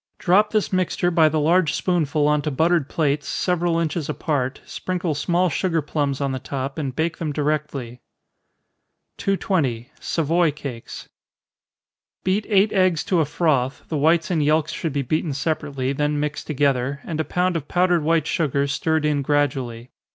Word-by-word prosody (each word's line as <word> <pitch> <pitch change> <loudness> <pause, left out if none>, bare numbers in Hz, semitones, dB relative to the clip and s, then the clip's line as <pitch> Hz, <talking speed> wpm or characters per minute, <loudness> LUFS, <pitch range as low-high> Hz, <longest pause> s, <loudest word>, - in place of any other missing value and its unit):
Drop 205 +4 +3
this 215 -3 0
mixture 180 -1 +1
by 160 -2 +5
the 155 +1 0
large 165 +1 +3
spoonful 155 -4 +1
on 150 0 +2
to 150 - -2
buttered 160 +1 +1
plates, 145 -2 0
several 175 -2 0
inches 165 -1 -2
apart, 135 -3 -1
sprinkle 180 -3 -3
small 175 +5 +1
sugar 165 +1 0
plums 145 -2 -1
on 140 -1 -1
the 130 - -3
top, 135 +3 -4
and 135 -4 -3
bake 165 +2 -1
them 155 -3 -2
directly. 145 -5 -2 1.2
220. 155 - -1
Savoy 165 +1 +1
Cakes. 140 -5 -7 1.2
Beat 195 +3 0
eight 205 0 +3
eggs 185 -4 +2
to 180 - +1
a 160 - +3
froth 140 -4 0
the 155 - -1
whites 165 +4 +2
and 160 -4 +2
yelks 155 +1 +2
should 165 - -3
be 140 -1 0
beaten 155 +3 -1
separately, 140 -2 -2
then 150 +1 0
mixed 150 0 -3
together, 140 -2 0
and 160 -2 -4
a - - +2
pound 180 +2 0
of 150 -3 -3
powdered 180 -1 +2
white 160 0 +2
sugar 140 -4 0
stirred 155 +2 0
in 150 -2 +1
gradually. 130 -4 -1
155 Hz, 165 wpm, -22 LUFS, 140-170 Hz, 1.2 s, by